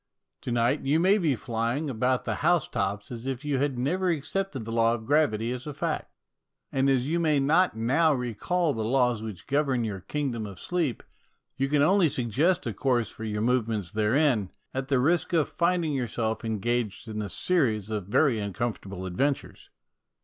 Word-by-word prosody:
To 125 - -4
night 120 +4 +2
you 145 +4 +2
may 195 +5 +4
be 155 -7 +2
flying 120 +6 -2
about 125 0 0
the - - -2
house 170 0 +3
tops 100 +2 -3
as 120 +1 -6
if 135 +1 -4
you 140 -3 0
had 140 -2 0
never 180 +9 0
accepted 160 - -2
the 115 - -5
law 115 0 +3
of 110 -1 -8
gravity 125 -6 +2
as 125 +3 -5
a 145 - -5
fact. - - -3 0.6
And 135 +1 +2
as 130 -2 +2
you 165 +4 0
may 155 -4 +2
not 155 +1 +3
now 140 +8 +3
recall 145 - 0
the 110 - -3
laws 125 -1 +2
which 110 -5 -7
govern 140 -4 +1
your 105 -4 -3
kingdom 120 +1 -3
of 100 -3 -10
sleep, 165 -9 -2 0.5
you 135 +1 -1
can 145 0 +3
only 185 0 +4
suggest 135 - +1
a 115 - -2
course 120 0 0
for 110 - -8
your 105 -1 -2
movements 115 -6 0
therein, 110 -1 +2 0.2
at 135 0 -3
the 135 - +2
risk 170 +7 +1
of 160 -3 +2
finding 170 -3 +1
yourself 115 -4 -2
engaged 115 0 -2
in 110 -1 -4
a 100 - -4
series 110 - 0
of 105 -4 -3
very 125 +3 +3
uncom 105 +3 -2
fortable 95 -1 -8
adventures. 135 +10 -2
125 Hz, 185 wpm, -27 LUFS, 110-150 Hz, 0.6 s, may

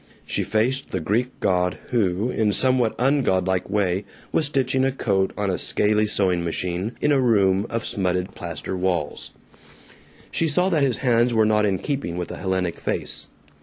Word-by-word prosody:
She - - -1
faced 125 +5 0
the 95 - -2
Greek 105 +10 0
god 90 -1 +1
who, 105 0 +1
in 110 -3 +1
a - - +1
somewhat 130 -2 +2
ungodlike 95 -10 +1
way, 100 -2 0 0.3
was 155 - +3
stitching 135 -2 +1
a 135 - +2
coat 100 -7 0
on 100 -2 0
a 90 - -2
scaley 105 +1 +2
sewing 90 -4 +1
machine, 90 +5 -2
in 150 - +2
a 140 - +4
room 100 -4 +3
of 115 -1 -3
smutted 90 -2 -1
plaster - - -5
walls. 90 -5 -2 1.0
She 165 - +1
saw 180 +5 +2
that 160 -5 +1
his 130 -5 +1
hands 120 0 +3
were 110 -1 +4
not 105 0 +3
in 95 -2 +1
keeping 115 - -3
with 90 - -4
a - - -6
Hellenic 95 -2 -2
face. - - -2
105 Hz, 175 wpm, -23 LUFS, 95-125 Hz, 1.0 s, a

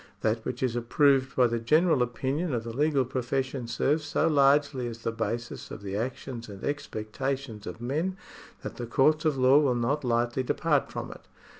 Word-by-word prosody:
That 110 +1 0
which 125 +1 -3
is 125 -2 0
approved 135 +2 +2
by 125 - +5
the 115 -1 0
general 155 +4 +3
opinion 135 +5 -1
of 115 - -2
the 115 0 -6
legal 145 -2 +2
profession 130 0 -2
serves 150 +6 +1
so 150 +2 +1
largely 140 -3 +3
as 115 -1 -8
the 115 - 0
basis 115 +1 -4
of - - -8
the 100 -1 -4
actions 120 +1 -4
and 100 -1 -10
expectations 130 -3 -4
of - - -7
men, 155 +10 -2 0.5
that - - -6
the 120 -2 -5
courts 155 +6 +3
of 150 -3 +2
law 130 +2 +6
will 135 -5 +2
not 130 +5 0
lightly 120 +1 +1
depart 130 - 0
from - - -5
it. - - -13
130 Hz, 185 wpm, -28 LUFS, 120-140 Hz, 0.5 s, law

